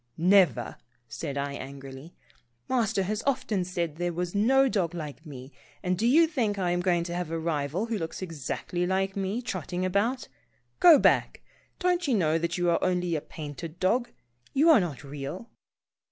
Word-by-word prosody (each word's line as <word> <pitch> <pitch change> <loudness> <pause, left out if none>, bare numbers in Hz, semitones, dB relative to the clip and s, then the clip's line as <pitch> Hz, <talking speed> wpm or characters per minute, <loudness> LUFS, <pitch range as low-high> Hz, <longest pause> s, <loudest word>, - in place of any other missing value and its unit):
" 120 - -45 0.2
Never," 175 - +3 0.3
said 140 +5 -5
I 140 0 -2
angrily. 135 +3 -9 0.3
" 120 0 -45
Master 220 -6 +1
has 210 +3 -2
often 220 -8 0
said 175 -2 -2
that 155 - -19
there 175 0 0
was 175 +1 -3
no 265 +7 +4
dog 180 -8 -1
like 155 0 -7
me, 135 -1 -10 0.3
and 180 0 +1
do 220 +6 0
you 315 +7 +6
think 240 -11 -1
I 180 -2 0
am 175 - +1
going 175 -2 +1
to 170 0 -5
have 175 -2 -3
a 165 - -2
rival 160 +3 -1
who 225 -2 -2
looks 165 -1 -5
exactly 175 +2 -3
like 190 +1 0
me, 200 +5 -2
trotting 185 -3 -3
about? 210 +8 0 0.5
Go 345 -4 +9
back. - - +2 0.4
Don't 360 -2 +1
you 260 - +2
know 165 -4 +2
that 170 +2 -2
you 175 0 0
are - - +1
only 180 -2 0
a 150 - -2
painted 155 +3 -8
dog? 235 +6 +1 0.4
You 310 +5 +5
are 295 - +7
not 160 -8 -4
real." 145 +10 -7
180 Hz, 190 wpm, -27 LUFS, 155-210 Hz, 0.5 s, Go